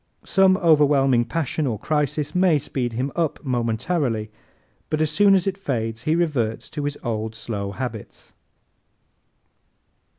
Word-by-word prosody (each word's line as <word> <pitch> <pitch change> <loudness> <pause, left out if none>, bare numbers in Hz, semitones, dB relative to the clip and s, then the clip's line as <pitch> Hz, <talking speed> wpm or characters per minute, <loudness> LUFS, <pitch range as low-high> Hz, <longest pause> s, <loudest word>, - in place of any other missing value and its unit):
Some 190 -1 +4
overwhelming 140 -7 +4
passion 155 0 -1
or 115 -4 -1
crisis 150 +3 -1
may 180 -3 +4
speed 125 -3 -3
him 130 +4 -2
up 165 -3 0
momentarily 120 -1 -1 0.6
but 155 - -1
as 155 -1 +1
soon 200 +4 +5
as 185 - +1
it 195 0 -2
fades 115 -8 -3
he 155 - +2
reverts 140 -10 -1
to 145 -2 -4
his 145 0 -3
old 110 -2 -3
slow 105 -3 -4
habits. 115 -3 -7
140 Hz, 135 wpm, -23 LUFS, 115-160 Hz, 0.6 s, soon